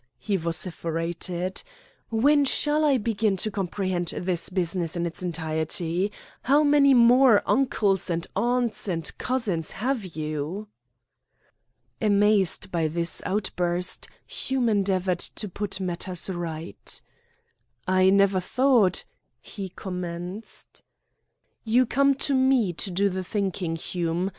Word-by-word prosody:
he 205 - -2
vociferated, 170 +1 -3 0.5
"when 285 +6 +4
shall 295 +2 +1
I 285 -3 +4
begin 215 -3 0
to 215 +4 -1
comprehend 185 -2 -2
this 175 0 -2
business 180 -2 -1
in 170 0 -1
its 170 +1 -6
entirety? 165 +2 -2 0.3
How 285 +4 +4
many 285 -2 +5
more 240 -1 +6
uncles, 210 -9 +1
and 170 0 -1
aunts, 240 -3 0
and 165 -4 -3
cousins 210 - -1
have 245 +1 -1
you?" 155 +4 -4 1.3
Amazed 205 -3 +2
by 165 -2 +1
this 170 +2 -1
outburst, 180 -3 -1 0.2
Hume 260 -3 -1
endeavoured 190 -4 +1
to 210 - 0
put 195 0 -4
matters 180 0 -3
right. 170 -2 -5 0.9
"I 185 0 +4
never 200 -1 +4
thought 230 -1 +2 0.2
" 120 - -50
he 195 - -7
commenced. 180 +2 -7 0.8
"You 240 +3 +3
come 275 +3 +3
to 280 - +1
me 260 -7 +3
to 190 - -2
do 195 +3 +1
the 190 -1 -3
thinking, 185 -4 -2
Hume. 170 +2 -2
190 Hz, 120 wpm, -25 LUFS, 175-225 Hz, 1.3 s, more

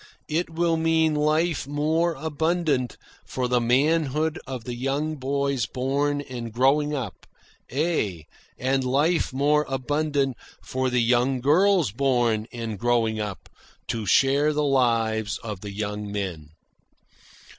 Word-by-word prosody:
It 165 +3 -1
will 165 0 +1
mean 160 -1 +2
life 155 0 +1
more 160 +4 +1
abundant 155 -3 -1 0.3
for 125 -1 -3
the 125 0 +2
manhood 150 +5 +1
of 130 -3 -5
the 125 - -5
young 140 +5 -2
boys 140 -3 -1
born 140 +3 -1
and 120 -4 -7
growing 145 +5 +2
up 120 -9 -6 0.4
ay, 125 - -1 0.3
and 135 +1 0
life 145 +7 +1
more 145 +3 +2
abundant 140 0 0 0.2
for 130 0 -2
the 125 -1 +2
young 125 +2 +2
girls 170 - +3
born 120 -3 +1
and 115 -4 -5
growing 115 -2 +1
up 105 -3 -5 0.4
to 110 -3 -2
share 140 +6 +4
the 150 0 0
lives 115 -6 +1
of 105 -5 -6
the 105 - -6
young 105 0 -4
men." 90 -7 -4
135 Hz, 130 wpm, -25 LUFS, 120-150 Hz, 0.4 s, share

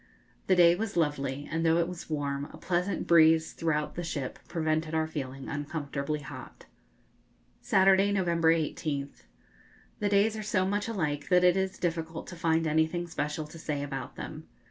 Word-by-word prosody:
The 185 - +5
day 170 -1 +7
was 200 +1 -3
lovely, 145 -3 -1
and 165 +1 -1
though 165 0 +4
it 170 -1 +2
was 180 -2 -8
warm, 140 -2 -2
a - - -11
pleasant 180 +2 -1
breeze 160 -1 +5
throughout 150 -2 -1
the 175 - -4
ship 140 -6 -4
prevented 155 -1 -1
our 160 0 +2
feeling 135 -4 -6
uncomfortably 145 0 -3
hot. - - -10 1.0
Saturday, 195 +1 +4
November 170 -4 +2
18th. 150 -3 -2 0.7
The 205 - +1
days 205 +2 +3
are 215 - -4
so 205 -3 +1
much 205 +2 -1
alike 150 -10 -2
that 180 0 +5
it 180 0 +5
is 190 0 -1
difficult 165 -2 -3
to 180 - -8
find 165 -1 +1
anything 160 +3 +1
special 155 -2 -3
to 160 +2 -12
say 145 -3 -3
about 140 -1 -5
them. - - -8
160 Hz, 165 wpm, -29 LUFS, 150-180 Hz, 1.0 s, day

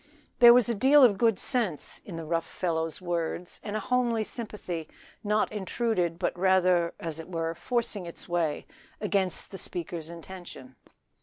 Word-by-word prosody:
There 240 -1 +10
was 245 -1 +5
a 235 - +1
deal 270 +6 +6
of 210 -6 +5
good 225 -4 +3
sense 225 - -1
in 180 - -8
the 165 -1 -5
rough 165 +1 -1
fellow's 165 -1 -2
words 175 0 -3
and 205 0 -4
a - - 0
homely 240 -1 +1
sympathy 200 -8 -6 0.3
not 210 0 +1
intruded 190 -4 -1
but 180 - -1
rather, 180 -2 +3
as 165 -1 -4
it 160 - -9
were, 165 -2 -2
forcing 210 0 -2
its 170 - -9
way 170 -4 -1 0.3
against 195 -4 -1
the 195 - -5
speaker's 170 -2 -5
intention. 170 -6 -10
185 Hz, 160 wpm, -28 LUFS, 170-215 Hz, 0.3 s, There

